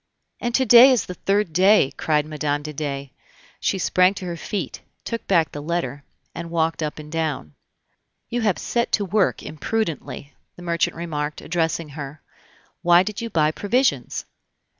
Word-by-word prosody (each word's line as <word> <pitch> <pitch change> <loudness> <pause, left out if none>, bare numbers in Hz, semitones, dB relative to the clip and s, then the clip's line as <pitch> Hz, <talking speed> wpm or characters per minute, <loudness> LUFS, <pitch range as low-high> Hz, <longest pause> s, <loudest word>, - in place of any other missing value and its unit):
"And 240 0 -1
to 260 - +3
day 245 +3 +9
is 250 -6 +2
the 180 - -6
third 195 -1 0
day!" 190 -4 +5
cried 150 -2 +1
Mme. 150 -1 -2
de 155 0 -6
Dey. 140 -2 -4 0.5
She - - 0
sprang 185 +1 +3
to 185 - -6
her 175 -1 -3
feet, 170 -1 -4 0.2
took 230 -1 -4
back 165 -6 +3
the 145 - -6
letter, 145 -4 -3 0.3
and 170 0 -6
walked 165 -1 0
up 150 -1 -3
and 150 0 -10
down. 155 - -2 0.7
"You 240 +1 -2
have 210 -4 +1
set 235 -1 -1
to 205 - +2
work 195 +1 +1
imprudently," 155 - -3 0.2
the 175 - -12
merchant 170 -1 0
remarked, 155 -3 -4
addressing 165 -1 -1
her. 145 0 -8 0.6
"Why 175 +1 +6
did 210 +2 -5
you 230 - -4
buy 155 -5 +2
provisions?" 205 - 0
165 Hz, 165 wpm, -23 LUFS, 150-200 Hz, 0.7 s, day